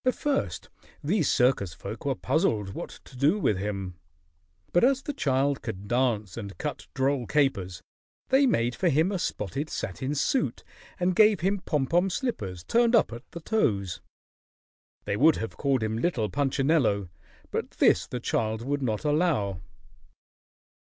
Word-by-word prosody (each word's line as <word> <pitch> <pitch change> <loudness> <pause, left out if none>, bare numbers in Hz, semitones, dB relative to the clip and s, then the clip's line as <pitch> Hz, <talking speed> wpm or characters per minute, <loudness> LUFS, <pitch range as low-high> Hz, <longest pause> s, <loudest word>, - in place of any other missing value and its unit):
At 255 - +2
first 290 -2 -2 0.4
these 165 +1 +1
circus 120 -8 +2
folk 110 +5 -8
were 135 -2 +1
puzzled 115 - 0
what - - -6 0.2
to 130 - -15
do 145 +10 +3
with 105 - +1
him, 95 -3 -4 0.7
but 175 - +4
as 270 +2 +3
the 290 - -3
child 140 - +1
could 100 -3 -6
dance 115 -6 0
and 100 -4 -7
cut - - -5
droll 135 -2 0
capers, 95 - 0 0.5
they 270 +1 +5
made 120 - +1
for 180 - +1
him 160 +6 +2
a 190 - -1
spotted 140 - -3
satin 130 - -3
suit 255 - 0 0.4
and 180 0 +1
gave 215 0 +5
him 195 +3 +1
pom 150 -6 0
pom 175 +6 +2
slippers 105 - -3
turned 235 - +3
up 215 - +3
at 120 +3 -10
the 170 - -8
toes. 100 - 0 1.0
They 100 - -1
would 155 +5 +5
have 115 - -5
called 135 -5 +1
him 110 0 -1
Little 120 -9 0
Punchinello, 135 - +1 0.4
but - - -2
this - - +3
the 125 - -4
child 110 -1 -1
would 145 +2 -1
not 110 0 -2
allow. 145 - +1
135 Hz, 160 wpm, -27 LUFS, 105-175 Hz, 1.0 s, they